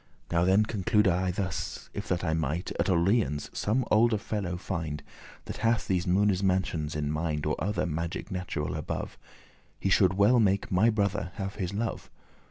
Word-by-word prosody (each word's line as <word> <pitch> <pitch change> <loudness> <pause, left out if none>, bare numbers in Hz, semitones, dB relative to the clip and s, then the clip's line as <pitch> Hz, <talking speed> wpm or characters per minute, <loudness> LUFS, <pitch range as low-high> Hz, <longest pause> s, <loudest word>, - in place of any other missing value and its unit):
Now 85 0 +3
then 95 +3 +5
conclude 105 0 +2
I 90 +1 +2
thus; 90 -1 -4
if - - -5
that 90 -1 -1
I 80 -2 +1
might 80 +3 -1
At - - +1
Orleans 85 - +1
some 115 +4 0
olde 110 0 +4
fellow 100 -5 -3
find, 85 -5 -4 0.4
That - - -6
hath 115 +1 +1
these 90 -1 0
Moone's 95 +1 +3
mansions 90 -5 0
in 75 -1 -1
mind, 75 -1 -2
Or 75 - +1
other 95 -2 0
magic 85 +1 -4
natural 90 -5 -3
above. - - -4 0.6
He 95 - 0
should 95 0 +4
well 105 +6 +5
make 100 +1 +2
my 100 +5 +4
brother 100 -4 -1
have 100 -2 -5
his 90 -3 -2
love. 110 +2 -3
95 Hz, 175 wpm, -28 LUFS, 85-105 Hz, 0.6 s, then